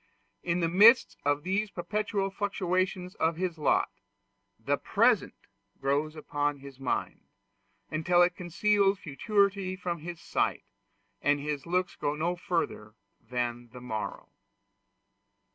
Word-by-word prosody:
In 170 Hz, +1 st, 0 dB
the 165 Hz, -, +2 dB
midst 210 Hz, +9 st, +6 dB
of 145 Hz, +1 st, +1 dB
these 200 Hz, +4 st, 0 dB
perpetual 195 Hz, +2 st, -2 dB
fluctuations 185 Hz, -2 st, -1 dB
of 160 Hz, +1 st, 0 dB
his 175 Hz, -3 st, -2 dB
lot, 150 Hz, -, +2 dB, 0.7 s
the 135 Hz, +6 st, 0 dB
present 230 Hz, +1 st, +2 dB, 0.4 s
grows 145 Hz, +3 st, 0 dB
upon 145 Hz, -1 st, -1 dB
his 135 Hz, -1 st, -12 dB
mind, 130 Hz, -2 st, -2 dB, 0.7 s
until 175 Hz, +3 st, +4 dB
it 175 Hz, 0 st, +1 dB
conceals 195 Hz, +3 st, +2 dB
futurity 195 Hz, +4 st, 0 dB
from 180 Hz, -2 st, -4 dB
his 170 Hz, +2 st, -7 dB
sight, -, -, -1 dB, 0.6 s
and 145 Hz, 0 st, +2 dB
his 145 Hz, +1 st, -4 dB
looks 180 Hz, +1 st, 0 dB
go 145 Hz, +1 st, -1 dB
no 170 Hz, +4 st, -1 dB
further 170 Hz, -, -3 dB, 0.2 s
than 120 Hz, -1 st, -3 dB
the 125 Hz, -, -9 dB
morrow. 110 Hz, -4 st, -5 dB
175 Hz, 125 wpm, -29 LUFS, 145-190 Hz, 0.7 s, midst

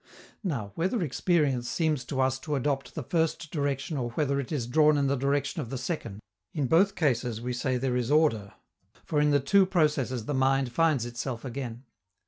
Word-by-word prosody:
Now, 120 Hz, -, -3 dB
whether 185 Hz, +5 st, 0 dB
experience 145 Hz, -5 st, +1 dB
seems 155 Hz, -5 st, 0 dB
to 135 Hz, 0 st, -2 dB
us 130 Hz, 0 st, +1 dB
to 150 Hz, +2 st, -3 dB
adopt 135 Hz, 0 st, -2 dB
the 155 Hz, -, -4 dB
first 160 Hz, +1 st, -1 dB
direction 145 Hz, 0 st, -2 dB
or 120 Hz, -2 st, -2 dB
whether 140 Hz, 0 st, 0 dB
it 140 Hz, -, -5 dB
is 140 Hz, -7 st, -1 dB
drawn 150 Hz, +4 st, +4 dB
in 140 Hz, -, +1 dB
the 140 Hz, +1 st, +2 dB
direction 140 Hz, +3 st, 0 dB
of 120 Hz, -, -6 dB
the 135 Hz, -, -4 dB
second, 120 Hz, -, -4 dB, 0.3 s
in 145 Hz, -, 0 dB
both 190 Hz, +9 st, +3 dB
cases 125 Hz, -7 st, 0 dB
we 125 Hz, +2 st, -3 dB
say 130 Hz, +1 st, -1 dB
there 125 Hz, 0 st, -1 dB
is 125 Hz, -1 st, -1 dB
order, 130 Hz, -10 st, +2 dB, 0.5 s
for 150 Hz, -2 st, +1 dB
in 150 Hz, -, +3 dB
the 145 Hz, -1 st, +4 dB
two 195 Hz, +9 st, +4 dB
processes 145 Hz, -, +1 dB
the 145 Hz, -, -2 dB
mind 135 Hz, -1 st, +2 dB
finds 150 Hz, -3 st, +2 dB
itself 120 Hz, +1 st, -5 dB
again. 125 Hz, -1 st, -5 dB
140 Hz, 195 wpm, -28 LUFS, 125-155 Hz, 0.5 s, drawn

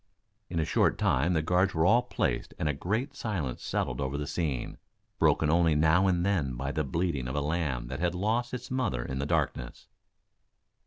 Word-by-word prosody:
In 85 Hz, -, -4 dB
a 80 Hz, -, +1 dB
short -, -, +2 dB
time 75 Hz, +8 st, +2 dB
the 80 Hz, -2 st, +1 dB
guards 90 Hz, +3 st, +2 dB
were 80 Hz, +1 st, +2 dB
all 115 Hz, +6 st, +5 dB
placed -, -, -2 dB
and -, -, -1 dB
a 75 Hz, -, +1 dB
great 110 Hz, -, -2 dB
silence 90 Hz, -, -3 dB
settled -, -, -2 dB
over 65 Hz, +1 st, -2 dB
the 75 Hz, -, -3 dB
scene, 70 Hz, -4 st, -3 dB, 0.4 s
broken 80 Hz, -, +3 dB
only 85 Hz, -2 st, +3 dB
now 80 Hz, +5 st, +4 dB
and 90 Hz, -1 st, +1 dB
then 80 Hz, -11 st, 0 dB
by 70 Hz, +3 st, -3 dB
the 75 Hz, -, -1 dB
bleating 75 Hz, -2 st, -1 dB
of 65 Hz, -, -4 dB
a -, -, +1 dB
lamb 75 Hz, -5 st, -1 dB
that 65 Hz, +2 st, -5 dB
had 85 Hz, 0 st, 0 dB
lost 115 Hz, +6 st, 0 dB
its 125 Hz, 0 st, -6 dB
mother 110 Hz, -, -1 dB
in 65 Hz, 0 st, -4 dB
the 70 Hz, -, -2 dB
darkness. -, -, -2 dB
80 Hz, 200 wpm, -29 LUFS, 70-95 Hz, 0.4 s, all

